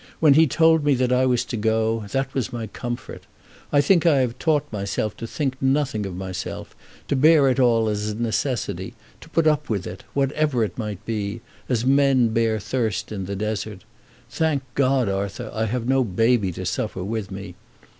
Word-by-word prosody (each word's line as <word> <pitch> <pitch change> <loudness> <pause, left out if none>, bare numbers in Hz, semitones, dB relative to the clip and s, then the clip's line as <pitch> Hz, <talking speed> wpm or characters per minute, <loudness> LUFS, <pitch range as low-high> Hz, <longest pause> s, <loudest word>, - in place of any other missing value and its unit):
"When 155 -3 +6
he 160 +3 +5
told 160 +2 +4
me 145 -2 +3
that 125 0 +1
I 130 +1 +3
was 125 -1 +1
to 120 - -4
go, 110 0 0
that 135 +2 -2
was 130 -4 -2
my 115 -2 -4
comfort. 120 +3 -7 0.4
I 145 - +5
think 175 +2 +3
I 150 -6 +4
have 125 -1 -2
taught 155 -3 +2
myself 105 +1 -2
to 115 - -6
think 130 0 -3
nothing 135 -6 +1
of 95 - -7
myself, 95 -1 -6 0.3
to - - 0
bear 150 +1 +5
it 130 - +1
all 115 -3 +3
as 105 0 -1
a 105 - -3
necessity, 120 +1 -2 0.2
to - - -14
put 165 - +1
up 150 -1 +2
with 100 -4 -1
it, 90 - -8
whatever 140 -2 +1
it 105 - -3
may 105 -4 -4
be, 110 0 -3 0.3
as 120 -2 0
men 135 -3 +4
bear 110 -1 +1
thirst 110 -2 -2
in 100 -3 -4
the 100 +2 -4
desert. 105 0 -4 0.4
Thank 140 +2 0
God, 135 -3 +2
Arthur, 100 +3 -3
I 110 0 0
have 115 +2 -2
no 135 0 +3
baby 115 -1 +2
to 95 - -6
suffer 90 +1 -2
with 105 0 -3
me. 95 -1 -7
120 Hz, 195 wpm, -23 LUFS, 105-135 Hz, 0.4 s, When